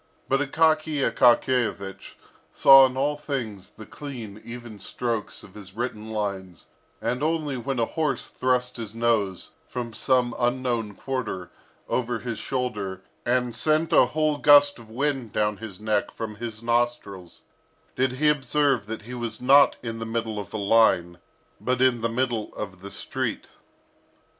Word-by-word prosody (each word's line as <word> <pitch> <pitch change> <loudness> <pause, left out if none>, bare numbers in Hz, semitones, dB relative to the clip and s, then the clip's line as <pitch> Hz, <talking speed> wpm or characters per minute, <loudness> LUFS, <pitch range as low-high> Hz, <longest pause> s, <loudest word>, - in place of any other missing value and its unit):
But 135 - +2
Akaky 155 0 +2
Akakiyevich 120 -5 +1 0.4
saw 135 -1 +8
in 130 0 -8
all 145 +2 +1
things 125 -10 -5
the 110 - -12
clean, 115 -8 -8
even 120 -3 -9
strokes 115 -2 -4
of 95 - -14
his 95 -2 -11
written 110 -2 -4
lines; 100 -5 -4 0.3
and 125 +2 -2
only 155 -2 0
when 130 +2 -3
a 115 - +2
horse 155 0 -2
thrust 125 -1 0
his 110 -2 -6
nose, 110 -5 0 0.2
from 120 -2 -5
some 125 0 +1
unknown 120 -4 -1
quarter, 115 -10 -4 0.4
over 120 -1 -1
his 115 -1 -5
shoulder, 105 -9 -3 0.2
and 125 -1 +1
sent 155 +3 +1
a 130 - +6
whole 155 +1 0
gust 145 -2 +6
of 115 -2 -14
wind 130 -2 -2
down 105 -1 0
his 105 -4 -9
neck 105 -1 0
from 110 -2 -6
his 115 0 -6
nostrils, 115 -7 -2 0.5
did 130 0 +1
he 150 +4 +1
observe 140 -5 +2
that 110 -1 -6
he 120 +3 -9
was 120 -2 -3
not 140 +3 +6
in 115 -1 -5
the 115 - -4
middle 115 -2 -2
of 100 -1 -8
a - - -4
line, 100 -5 +3 0.4
but 125 0 -1
in 130 -2 +3
the 115 - 0
middle 120 -2 -1
of 95 -3 -7
the 100 - -8
street. - - -4
120 Hz, 155 wpm, -25 LUFS, 110-130 Hz, 0.5 s, saw